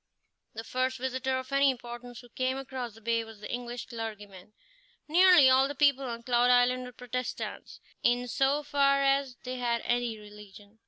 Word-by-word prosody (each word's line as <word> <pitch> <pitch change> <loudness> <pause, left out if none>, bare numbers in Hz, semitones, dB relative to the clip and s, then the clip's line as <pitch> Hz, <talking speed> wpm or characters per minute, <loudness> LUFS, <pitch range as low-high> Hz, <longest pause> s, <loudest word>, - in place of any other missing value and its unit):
The 225 - -5
first 255 +2 -1
visitor 260 +1 -2
of 260 +1 -7
any 275 0 +4
importance 240 -1 -7
who 245 - -17
came 260 +1 -2
across 260 -4 -6
the 225 - -16
bay 230 +1 0
was 225 -2 -13
the 210 - -7
English 245 0 -5
clergyman. 210 -4 -8 0.5
Nearly 350 -2 +7
all 260 +1 +5
the 285 - -6
people 280 -1 +3
on 235 -2 -6
Cloud 245 0 +2
Island 250 +1 +3
were 250 - -9
Protestants, 250 0 -6 0.2
in 245 +1 +1
so 270 +6 +1
far 275 -1 +2
as 275 -2 +1
they 255 0 -5
had 235 -1 -1
any 240 -2 -1
religion. 210 0 -14
250 Hz, 175 wpm, -29 LUFS, 235-265 Hz, 0.5 s, Nearly